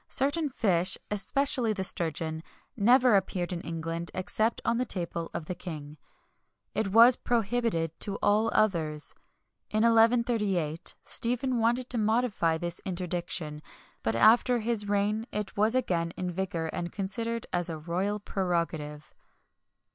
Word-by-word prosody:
certain 285 +3 +3
fish, 190 -7 +1
especially 235 +2 0
the 195 -2 -3
sturgeon, 160 -3 +1 0.3
never 245 +2 +4
appeared 185 -2 -1
in 170 - -4
England 165 0 -3
except 215 +5 -1
on 235 - +1
the - - +2
table 170 -6 -3
of 160 - -5
the 180 - -4
king: 155 -4 -8 0.8
it 220 - -1
was 230 +5 +7
prohibited 230 -7 -1
to 200 - -1
all 215 +2 +2
others. 160 -7 +2 0.6
In 215 +1 +1
1138, 225 -8 +2
Stephen 245 +1 0
wanted 240 +2 +1
to 240 - +2
modify 215 -7 +1
this 170 +1 -3
interdiction; 175 -4 -3 0.4
but 110 0 -1
after 240 - +5
his 220 -2 0
reign 210 +3 0
it 210 -1 -4
was 215 +4 +2
again 170 -9 -1
in 180 -1 -3
vigour, 170 -3 -3
and 175 0 -4
considered 225 +4 -3
as 175 0 0
a 160 - -4
royal 180 +6 -2
prerogative. 170 -6 -3
195 Hz, 135 wpm, -28 LUFS, 170-230 Hz, 0.8 s, was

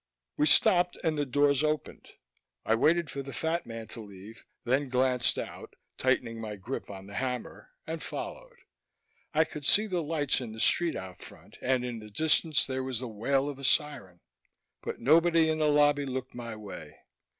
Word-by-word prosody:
We 150 - +2
stopped 175 +3 +5
and 160 -2 +1
the 145 -1 -1
doors 145 +1 +3
opened. 155 0 -2 0.6
I 110 - +3
waited 155 +6 +2
for 140 - -4
the 135 0 -8
fat 160 +6 -2
man 115 -1 -7
to 115 - -8
leave, 100 +2 -12 0.2
then 130 +3 0
glanced 125 -1 +1
out, - - -7 0.2
tightening 115 0 0
my 105 -2 -5
grip 105 +2 -6
on 95 -1 -9
the 100 - -12
hammer, 125 +2 -4 0.2
and - - -5
followed. - - -7 0.7
I 160 +1 +4
could 150 -2 -8
see 210 +9 +5
the 180 -5 -1
lights 145 -4 0
in 115 -3 -6
the 110 - -9
street 170 +7 +3
out 95 -1 -8
front - - -14
and 125 -1 +1
in 120 -2 -5
the 105 0 -11
distance 155 +5 +3
there 130 -1 -3
was 130 -2 -1
the 125 +2 -4
wail 135 +6 0
of 145 -2 -6
a - - -10
siren, 135 - 0 0.6
but - - -5
nobody 165 +4 +4
in 155 - -2
the 155 - +3
lobby 145 -1 +3
looked 130 0 -4
my 115 -2 -6
way. 100 -8 -9
130 Hz, 185 wpm, -29 LUFS, 115-155 Hz, 0.7 s, stopped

